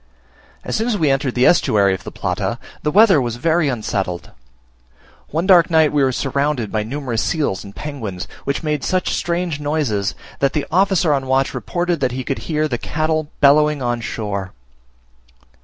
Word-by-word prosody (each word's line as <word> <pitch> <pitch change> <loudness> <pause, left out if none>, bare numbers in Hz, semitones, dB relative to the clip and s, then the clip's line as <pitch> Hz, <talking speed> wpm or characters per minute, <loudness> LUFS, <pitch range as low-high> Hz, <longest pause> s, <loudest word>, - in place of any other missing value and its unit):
As - - -3
soon 220 +2 0
as 230 -4 0
we 155 -6 +2
entered 135 -2 0
the 125 +1 +3
estuary 100 - +4
of 95 - -5
the - - -7
Plata, - - -2 0.2
the 150 - 0
weather 195 -3 +5
was 120 -2 -2
very 160 +4 +1
unsettled. 95 -7 -3 1.0
One 165 +4 -1
dark 180 -3 +6
night 160 -2 +4
we 145 -2 +2
were 130 - +2
surrounded 140 -3 -1
by 110 - 0
numerous 120 0 -3
seals 145 - -1
and 100 0 -12
penguins, 110 -12 -6 0.2
which 140 +4 -2
made 150 -3 -1
such 185 -1 0
strange 170 -3 -2
noises, 145 -10 -1 0.2
that 140 -1 +1
the 150 -3 -1
officer 185 -3 +3
on 135 -2 -1
watch 135 +1 +1
reported 175 -3 -2
he 130 +1 -4
could 135 - -3
hear 155 -1 +1
the 120 -5 -3
cattle 155 0 -1
bellowing 150 0 +4
on 120 -1 -1
shore. 100 -4 -4
145 Hz, 175 wpm, -19 LUFS, 120-160 Hz, 1.0 s, dark